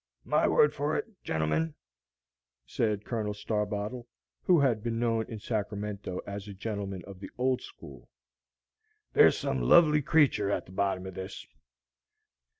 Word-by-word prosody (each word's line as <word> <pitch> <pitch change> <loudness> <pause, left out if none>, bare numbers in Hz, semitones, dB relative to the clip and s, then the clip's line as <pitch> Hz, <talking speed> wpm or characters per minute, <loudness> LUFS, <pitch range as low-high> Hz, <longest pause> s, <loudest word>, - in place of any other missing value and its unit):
"My - - +2
word 150 - +4
for 145 +2 -1
it, - - -4
gentlemen," 80 0 -1 0.9
said 105 -2 -1
Colonel 105 -3 -2
Starbottle, 105 +3 -3 0.3
who 175 -5 +4
had 120 -6 +2
been 115 +1 -2
known 115 -1 +1
in 110 - -6
Sacramento 105 -3 -3
as 100 0 -6
a 100 - -8
Gentleman 100 -2 -4
of 100 -2 -11
the 100 - -8
Old 130 0 +1
School, - - -12 1.0
"there's 440 0 +6
some - - -1
lovely 150 -3 +6
creature 135 -9 +3
at - - -1
the - - -15
bottom 95 -1 -1
of 95 - -7
this." 95 +1 -7
105 Hz, 145 wpm, -29 LUFS, 100-120 Hz, 1.0 s, there's